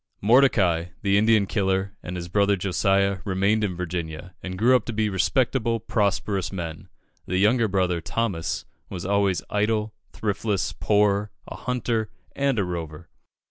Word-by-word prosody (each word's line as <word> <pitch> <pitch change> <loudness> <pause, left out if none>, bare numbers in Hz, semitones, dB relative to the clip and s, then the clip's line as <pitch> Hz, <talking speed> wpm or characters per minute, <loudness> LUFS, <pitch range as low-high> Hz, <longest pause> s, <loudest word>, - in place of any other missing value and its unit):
Mordecai, 100 -8 +4 0.2
the 100 -1 +3
Indian 110 0 +4
killer, 95 -1 0
and 90 - -6
his 85 -1 -5
brother, 100 +2 +2
Josiah, 100 +1 +1
remained 100 +2 +1
in 95 -4 -1
Virginia, 85 -1 -5
and 95 0 -6
grew 120 +6 +5
up 125 - +2
to 120 - -4
be 110 0 0
respectable, 115 +3 +1
prosperous 100 -2 -1
men. 85 -4 -6 0.4
The 90 - -1
younger 110 +4 +3
brother, 90 -3 0
Thomas, 90 -4 -2 0.2
was 90 -2 -6
always 100 -2 +1
"idle, 105 +1 0 0.2
thriftless, 100 -1 -2
poor, 105 0 +2 0.2
a - - -7
hunter, 115 -3 -2 0.3
and 140 -3 +1
a 105 - +2
rover." 85 -2 -6
100 Hz, 145 wpm, -24 LUFS, 90-110 Hz, 0.4 s, grew